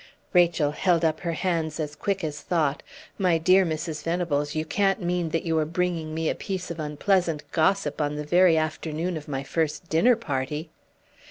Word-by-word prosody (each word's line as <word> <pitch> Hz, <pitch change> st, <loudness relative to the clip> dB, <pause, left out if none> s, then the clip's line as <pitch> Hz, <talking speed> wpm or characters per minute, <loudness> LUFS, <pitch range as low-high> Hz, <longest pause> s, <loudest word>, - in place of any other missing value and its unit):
Rachel 170 Hz, -5 st, +4 dB
held 170 Hz, +1 st, +2 dB
up 155 Hz, -1 st, +1 dB
her 170 Hz, -3 st, -2 dB
hands 165 Hz, -3 st, -1 dB
as 150 Hz, -1 st, -3 dB
quick 195 Hz, +1 st, -2 dB
as 150 Hz, -2 st, -4 dB
thought. 155 Hz, -5 st, 0 dB, 0.4 s
"My 180 Hz, -4 st, +3 dB
dear 185 Hz, +4 st, +5 dB
Mrs. 160 Hz, -2 st, -3 dB
Venables, 160 Hz, -4 st, -1 dB
you 155 Hz, 0 st, -1 dB
can't 195 Hz, +4 st, +1 dB
mean 175 Hz, -2 st, -1 dB
that 165 Hz, +1 st, -1 dB
you 165 Hz, -1 st, +1 dB
are -, -, +2 dB
bringing 165 Hz, -1 st, -2 dB
me 160 Hz, 0 st, -1 dB
a -, -, +2 dB
piece 190 Hz, -3 st, -5 dB
of 170 Hz, -, -6 dB
unpleasant 155 Hz, +1 st, 0 dB
gossip 160 Hz, -2 st, +1 dB
on 145 Hz, 0 st, -1 dB
the 150 Hz, 0 st, -4 dB
very 175 Hz, +1 st, +5 dB
afternoon 160 Hz, +2 st, -2 dB
of 155 Hz, -2 st, -7 dB
my 135 Hz, -2 st, -3 dB
first 160 Hz, +3 st, -2 dB
dinner 230 Hz, +10 st, +4 dB
party?" 150 Hz, -, -3 dB
160 Hz, 185 wpm, -25 LUFS, 155-180 Hz, 0.4 s, dear